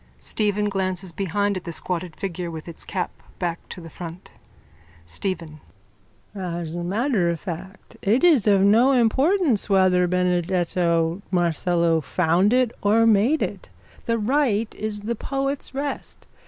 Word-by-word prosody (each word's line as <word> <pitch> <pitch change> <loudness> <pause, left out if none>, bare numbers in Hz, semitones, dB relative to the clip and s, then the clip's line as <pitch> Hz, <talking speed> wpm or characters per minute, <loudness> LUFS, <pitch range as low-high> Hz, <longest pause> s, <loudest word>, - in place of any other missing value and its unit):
Stephen 210 -1 0
glances 190 -2 -2
behind 200 +3 -1
at 185 - -5
the 170 - -5
squatted 175 0 -3
figure 180 -2 -4
with 160 -1 -8
its 170 - -9
cap 185 -2 -3 0.3
back 170 -2 -2
to - - -8
the 165 - -10
front.)_ 170 +2 -9 0.7
STEPHEN: 155 - -4 0.7
As 175 -4 -4
a 175 0 -4
matter 200 0 +1
of 170 -1 -2
fact 190 +2 -8
it 225 - +2
is 300 - +5
of 200 -2 +5
no 225 +7 +5
importance 265 - +2
whether 185 -2 +4
Benedetto 175 -1 +1
Marcello 170 -1 +1
found 175 +6 +2
it 250 -2 +3
or 220 +3 +4
made 225 +8 +3
it. - - -5 0.4
The 230 0 +2
rite 230 -2 +1
is 210 -1 -5
the 225 +3 -2
poet's 275 +3 -3
rest. 280 +1 -5
190 Hz, 140 wpm, -23 LUFS, 175-220 Hz, 0.7 s, is